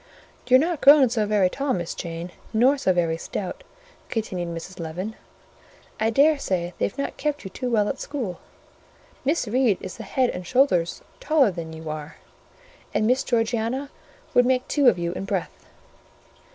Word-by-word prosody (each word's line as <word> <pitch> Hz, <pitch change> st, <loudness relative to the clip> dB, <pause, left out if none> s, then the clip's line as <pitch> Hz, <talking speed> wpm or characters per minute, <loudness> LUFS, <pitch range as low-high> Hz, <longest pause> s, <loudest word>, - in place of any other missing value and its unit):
"You're 255 Hz, -, +7 dB
not 325 Hz, +1 st, -1 dB
grown 280 Hz, -3 st, +7 dB
so 220 Hz, -3 st, 0 dB
very 205 Hz, -3 st, +3 dB
tall, 275 Hz, +7 st, -1 dB
Miss 175 Hz, -2 st, -3 dB
Jane, 170 Hz, +1 st, -6 dB, 0.2 s
nor 250 Hz, +6 st, +4 dB
so 265 Hz, -9 st, +1 dB
very 170 Hz, -2 st, +1 dB
stout," 185 Hz, +2 st, -5 dB, 0.5 s
continued 185 Hz, -6 st, -3 dB
Mrs. 170 Hz, +3 st, -7 dB
Leaven. 175 Hz, +6 st, -4 dB, 0.9 s
"I 220 Hz, -, +2 dB
dare 285 Hz, +6 st, +4 dB
say 180 Hz, -5 st, -2 dB
they've -, -, -1 dB
not 280 Hz, -, -3 dB
kept 295 Hz, -1 st, -2 dB
you 190 Hz, -, -7 dB
too 250 Hz, +6 st, -3 dB
well 215 Hz, -3 st, +2 dB
at 270 Hz, -, -3 dB
school: 245 Hz, -, -4 dB, 0.8 s
Miss 285 Hz, -1 st, 0 dB
Reed 235 Hz, -3 st, +2 dB
is 185 Hz, -, -8 dB
the -, -, -7 dB
head 255 Hz, -2 st, +1 dB
and 180 Hz, -1 st, -7 dB
shoulders 185 Hz, -10 st, +2 dB, 0.2 s
taller 285 Hz, -7 st, +3 dB
than 170 Hz, -2 st, -6 dB
you 160 Hz, 0 st, -9 dB
are; 155 Hz, 0 st, -7 dB, 0.8 s
and 215 Hz, -, +2 dB
Miss 250 Hz, +4 st, +2 dB
Georgiana 235 Hz, +3 st, -1 dB, 0.4 s
would 245 Hz, 0 st, +5 dB
make 255 Hz, -1 st, +1 dB
two 285 Hz, -3 st, +3 dB
of 220 Hz, -7 st, +6 dB
you 170 Hz, 0 st, -2 dB
in 190 Hz, -, -5 dB
breadth." -, -, -4 dB
220 Hz, 170 wpm, -24 LUFS, 180-265 Hz, 0.9 s, You're